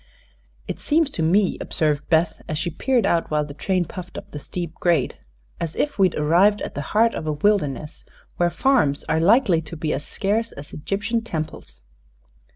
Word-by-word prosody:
"It - - -4
seems 305 -1 +2
to 175 - -3
me," 185 +5 +2
observed 150 -3 0
Beth, 160 0 +2
as 155 - -1
she 170 +2 -2
peered 255 -5 +1
out 170 -4 +1
while 150 -1 +1
the 145 - -9
train 180 +5 0
puffed 180 +2 -8
up - - -9
the 145 - -6
steep 170 +2 -5
grade, 170 -7 +1 0.4
"as 165 -1 -3
if 290 -8 -1
we'd 185 -3 +4
arrived 175 +8 +4
at - - -5
the 145 - -3 0.2
heart 230 +1 +5
of 155 - -4
a 155 - +1
wilderness, 150 -4 0 0.3
where 175 0 +3
farms 170 - +2
are 160 - 0
likely 195 -1 +4
to 165 +1 -8
be 155 0 -1
as - - -3
scarce 220 +7 -1
as 145 +1 -10
Egyptian 205 +8 -1
temples." 160 - -5
170 Hz, 185 wpm, -23 LUFS, 155-205 Hz, 0.4 s, heart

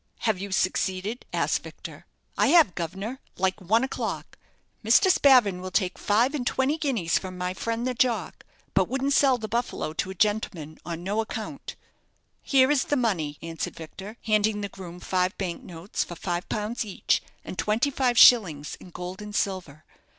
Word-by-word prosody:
"Have 220 -5 +1
you 200 +1 -6
succeeded?" 190 +4 -1
asked - - 0
Victor. - - -11 0.3
"I - - +3
have, 315 - +6
guv'nor, 190 +10 -5 0.2
like 190 +2 0
one 220 +7 +2
o'clock. 265 - -4 0.4
Mr. 240 - +5
Spavin 245 - +5
will 185 - -5
take 185 0 0
five 230 +7 +2
and 255 -5 -2
twenty 270 +5 +1
guineas 240 - +1
from 185 -1 -8
my 180 0 -2
friend 230 +4 -3
the 255 - 0
jock; 245 -1 0 0.3
but - - +2
wouldn't 270 +2 0
sell 270 -3 +4
the 220 -2 -5
'Buffalo' 235 -8 -2
to 175 - -2
a 190 - -6
gentleman 180 -6 -1
on 170 0 -6
no 205 +4 0
account." 225 +5 -6 0.7
"Here 265 0 +4
is 290 -3 +2
the 290 - 0
money," 170 - -1
answered 165 -1 -5
Victor, 195 +7 -9
handing 215 -1 +2
the 200 - -3
groom 180 -2 -10
five 185 +1 0
bank 180 -3 -3
notes 175 +3 -4
for 175 - -8
five 175 +1 -3
pounds 215 +3 -2
each, 205 -4 0 0.2
and - - -6
twenty 230 +7 +1
five 255 -3 +1
shillings 170 - +6
in - - -13
gold 180 +3 -7
and 210 0 -7
silver. 180 -8 -2
205 Hz, 175 wpm, -26 LUFS, 180-240 Hz, 0.7 s, have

